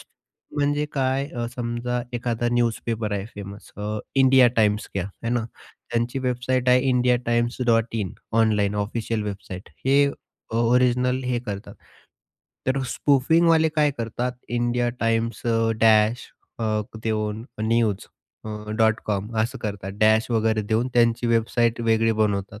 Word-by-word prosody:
स -, -, -15 dB, 0.5 s
म्हणजे 145 Hz, +1 st, +1 dB
काय 135 Hz, 0 st, 0 dB
अ, 120 Hz, -1 st, -2 dB
समजा 120 Hz, 0 st, -2 dB
एखादा 120 Hz, 0 st, -1 dB
न्यूजपेपर 115 Hz, -2 st, -1 dB
आहे 100 Hz, 0 st, -2 dB
फेमस 100 Hz, 0 st, -9 dB
अ, 105 Hz, +1 st, -3 dB, 0.2 s
इंडिया 130 Hz, -2 st, +6 dB
टाइम्स 105 Hz, -1 st, +2 dB
घ्या, 100 Hz, -1 st, -1 dB, 0.2 s
है -, -, -1 dB
ना. 120 Hz, -2 st, 0 dB, 0.5 s
त्यांची 120 Hz, +2 st, -1 dB
वेबसाईट 125 Hz, 0 st, -1 dB
आहे 125 Hz, 0 st, +6 dB
indiatimes.in 120 Hz, -3 st, +1 dB, 0.3 s
ऑनलाइन 105 Hz, -2 st, +2 dB
ऑफिशियल 110 Hz, 0 st, -3 dB
वेबसाईट. 95 Hz, -2 st, -7 dB, 0.2 s
हे 140 Hz, +1 st, +5 dB, 0.5 s
अ, 115 Hz, -, -1 dB
ओरिजिनल 125 Hz, +2 st, +2 dB
हे 125 Hz, -1 st, 0 dB
करतात. 105 Hz, -4 st, -7 dB, 0.9 s
तर 130 Hz, +1 st, +1 dB
स्पूफिंगवाले 160 Hz, +5 st, +3 dB
काय 150 Hz, -1 st, +4 dB
करतात, 120 Hz, +2 st, -2 dB, 0.2 s
इंडिया 120 Hz, 0 st, 0 dB
टाइम्स 115 Hz, +1 st, 0 dB
अ, 115 Hz, -1 st, +2 dB
डॅश 110 Hz, +1 st, +4 dB, 0.3 s
अ, 110 Hz, -2 st, 0 dB, 0.2 s
देऊन 110 Hz, 0 st, -2 dB, 0.2 s
न्यूज 110 Hz, -3 st, +1 dB, 0.4 s
अ, 110 Hz, -, -6 dB, 0.3 s
डॉट 110 Hz, 0 st, +3 dB
कॉम 105 Hz, +2 st, -2 dB
असं 130 Hz, +4 st, -3 dB
करतात. 100 Hz, -3 st, -5 dB
डॅश 110 Hz, +3 st, +4 dB
वगैरे 110 Hz, -1 st, +1 dB
देऊन 110 Hz, +4 st, 0 dB
त्यांची 120 Hz, 0 st, +3 dB
वेबसाईट 115 Hz, 0 st, +1 dB
वेगळी 115 Hz, 0 st, +2 dB
बनवतात. 100 Hz, 0 st, -1 dB
115 Hz, 135 wpm, -24 LUFS, 110-125 Hz, 0.9 s, इंडिया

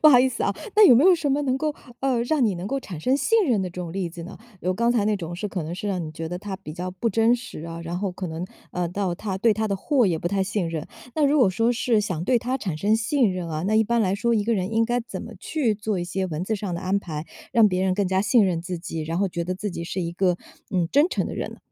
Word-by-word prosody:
不 310 Hz, -, +8 dB
好 255 Hz, -4 st, +8 dB
意 260 Hz, -, +4 dB
思 235 Hz, -, -4 dB
哦， 200 Hz, -, 0 dB, 0.2 s
那 425 Hz, -2 st, +9 dB
有 250 Hz, -, +8 dB
没 250 Hz, -, +5 dB
有 375 Hz, -, +8 dB
什 310 Hz, -4 st, -1 dB
么 285 Hz, +2 st, +1 dB
能 265 Hz, -1 st, 0 dB
够 305 Hz, 0 st, -1 dB, 0.3 s
呃， 260 Hz, -3 st, +1 dB
让 270 Hz, +2 st, +2 dB
你 200 Hz, -, 0 dB
能 175 Hz, +1 st, -6 dB
够 275 Hz, +6 st, -1 dB
产 180 Hz, -, -8 dB
生 255 Hz, +9 st, +2 dB
信 450 Hz, +8 st, +3 dB
任 230 Hz, -6 st, +2 dB
的 185 Hz, -, -2 dB
这 180 Hz, +1 st, -7 dB
种 170 Hz, -2 st, -5 dB
例 185 Hz, -2 st, -2 dB
子 170 Hz, 0 st, -9 dB
呢？ 175 Hz, -, -9 dB, 0.2 s
有 185 Hz, -, 0 dB
刚 235 Hz, +5 st, +1 dB
才 230 Hz, -4 st, +2 dB
那 210 Hz, 0 st, +2 dB
种 175 Hz, -2 st, -6 dB
是 205 Hz, +4 st, -4 dB
可 185 Hz, -4 st, -3 dB
能 165 Hz, +3 st, -4 dB
是 205 Hz, +3 st, -4 dB
让 185 Hz, -3 st, -1 dB
你 155 Hz, -, -6 dB
觉 160 Hz, 0 st, -5 dB
得 180 Hz, -, -4 dB
她 195 Hz, 0 st, -5 dB
比 170 Hz, -6 st, -9 dB
较 180 Hz, +3 st, -4 dB
不 205 Hz, +5 st, -1 dB
真 225 Hz, +3 st, +4 dB
实 245 Hz, -6 st, -7 dB
啊， 165 Hz, 0 st, -6 dB
然 170 Hz, +1 st, -4 dB
后 195 Hz, -1 st, -2 dB
可 185 Hz, 0 st, -5 dB
能， 165 Hz, +3 st, -4 dB, 0.2 s
呃， 180 Hz, -1 st, -2 dB
到 185 Hz, 0 st, -1 dB
她 190 Hz, +1 st, -4 dB
对 220 Hz, +3 st, +3 dB
她 220 Hz, +1 st, -1 dB
的 200 Hz, -, 0 dB
货 250 Hz, +3 st, +2 dB
也 170 Hz, -, +1 dB
不 175 Hz, -, -2 dB
太 195 Hz, 0 st, +1 dB
信 195 Hz, -3 st, -1 dB
任。 160 Hz, -2 st, -4 dB, 0.3 s
那 305 Hz, -, +3 dB
如 295 Hz, +2 st, +3 dB
果 245 Hz, -8 st, +5 dB
说 225 Hz, +5 st, +2 dB
是 240 Hz, -2 st, +2 dB
想 185 Hz, -6 st, -2 dB
对 250 Hz, +2 st, +3 dB
她 255 Hz, +3 st, -1 dB
产 185 Hz, -, -3 dB
生 205 Hz, +6 st, +3 dB
信 230 Hz, -1 st, +2 dB
任 180 Hz, -2 st, -4 dB
啊， 155 Hz, 0 st, -3 dB
那 215 Hz, -, +1 dB
一 220 Hz, -, +5 dB
般 235 Hz, +2 st, +1 dB
来 190 Hz, -3 st, +2 dB
说 235 Hz, +4 st, +1 dB
一 215 Hz, -3 st, +2 dB
个 230 Hz, +1 st, +2 dB
人 190 Hz, +2 st, -2 dB
应 225 Hz, +1 st, +3 dB
该 240 Hz, +1 st, 0 dB
怎 235 Hz, -, -7 dB
么 -, -, -9 dB
去 255 Hz, -9 st, 0 dB
做 210 Hz, -2 st, -2 dB
一 175 Hz, -, -2 dB
些 190 Hz, +2 st, -2 dB
文 165 Hz, 0 st, -3 dB
字 220 Hz, +3 st, -1 dB
上 200 Hz, -3 st, -4 dB
的 170 Hz, -, -4 dB
安 185 Hz, +2 st, 0 dB
排， 155 Hz, -5 st, -5 dB, 0.3 s
让 225 Hz, -3 st, +6 dB
别 185 Hz, 0 st, 0 dB
人 190 Hz, -1 st, +2 dB
更 200 Hz, 0 st, +1 dB
加 190 Hz, +1 st, +1 dB
信 225 Hz, 0 st, +4 dB
任 170 Hz, -3 st, -1 dB
自 180 Hz, 0 st, -4 dB
己， 165 Hz, -1 st, -5 dB
然 165 Hz, +3 st, -2 dB
后 200 Hz, -, +2 dB
觉 170 Hz, -1 st, -3 dB
得 185 Hz, +2 st, -2 dB
自 205 Hz, +2 st, -3 dB
己 170 Hz, -, -5 dB
是 175 Hz, +2 st, -3 dB
一 170 Hz, -1 st, -3 dB
个， 180 Hz, -1 st, +2 dB, 0.3 s
嗯， 175 Hz, -3 st, +1 dB
真 290 Hz, +5 st, +5 dB
诚 -, -, -1 dB
的 -, -, -5 dB
人 -, -, -3 dB
呢？ -, -, -11 dB
200 Hz, 340 characters per minute, -24 LUFS, 180-235 Hz, 0.3 s, 那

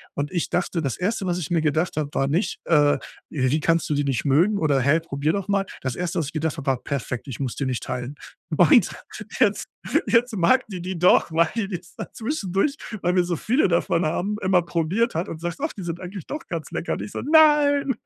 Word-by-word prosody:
Und 145 Hz, +1 st, -2 dB
ich 175 Hz, -3 st, -1 dB
dachte 175 Hz, -1 st, -1 dB
das 135 Hz, -6 st, -2 dB
1., 195 Hz, +2 st, -1 dB
was 175 Hz, -1 st, 0 dB
ich 160 Hz, -, -5 dB
mir 170 Hz, -2 st, +2 dB
gedacht 155 Hz, +2 st, 0 dB
habe, 150 Hz, -2 st, -1 dB
war 135 Hz, -, +1 dB
nicht, 165 Hz, +9 st, -1 dB
äh: 145 Hz, -3 st, +4 dB, 0.3 s
„Wie 135 Hz, +1 st, +1 dB
kannst 165 Hz, +1 st, +1 dB
du -, -, +1 dB
die 145 Hz, -, +1 dB
nicht 135 Hz, -4 st, -1 dB
mögen 170 Hz, +10 st, +3 dB
oder 145 Hz, -4 st, +2 dB
hä, 140 Hz, +5 st, +3 dB
probier 150 Hz, 0 st, -1 dB
doch 200 Hz, -2 st, -3 dB
mal?“ 200 Hz, -1 st, +1 dB, 0.2 s
Das 130 Hz, -2 st, -3 dB
1. 180 Hz, 0 st, -2 dB
was 155 Hz, -, -2 dB
ich -, -, -8 dB
gedacht 160 Hz, 0 st, -2 dB
habe, 140 Hz, -2 st, -7 dB
war: 130 Hz, -2 st, +1 dB
„Perfekt, 130 Hz, -2 st, -4 dB
ich 130 Hz, -, -7 dB
muss 130 Hz, -4 st, -3 dB
die 140 Hz, -, -2 dB
nicht 130 Hz, -2 st, -2 dB
teilen.“ 125 Hz, +2 st, -4 dB, 0.4 s
Und -, -, +6 dB, 0.5 s
jetzt -, -, +2 dB, 0.4 s
jetzt 235 Hz, 0 st, +2 dB
mag 220 Hz, +9 st, +3 dB
die 185 Hz, -4 st, -6 dB
die 185 Hz, +1 st, -4 dB
doch, 180 Hz, -1 st, +4 dB
weil 165 Hz, 0 st, +3 dB, 0.2 s
die 195 Hz, -, -3 dB
es 170 Hz, -, -20 dB
dann -, -, -6 dB
zwischendurch, 225 Hz, -, -1 dB, 0.3 s
weil 180 Hz, +1 st, +1 dB
wir 180 Hz, -, +4 dB
so 175 Hz, 0 st, -1 dB
viele 250 Hz, -, +2 dB
davon 170 Hz, -1 st, +1 dB
haben, 195 Hz, +7 st, -1 dB
immer 185 Hz, -1 st, +3 dB
probiert 170 Hz, +7 st, 0 dB
hat 165 Hz, +3 st, -1 dB
und 160 Hz, -, -7 dB
sagt: 175 Hz, +5 st, -4 dB
„Och, 310 Hz, +3 st, -2 dB
die 195 Hz, -, -8 dB
sind 170 Hz, 0 st, -4 dB
eigentlich 185 Hz, -1 st, -8 dB
doch 300 Hz, -, -6 dB
ganz 165 Hz, -3 st, -5 dB
lecker.“ -, -, -2 dB
Und -, -, -4 dB
ich -, -, -8 dB
so: -, -, -4 dB
„Nein.“ 290 Hz, -3 st, +4 dB
170 Hz, 235 wpm, -23 LUFS, 150-195 Hz, 0.5 s, Und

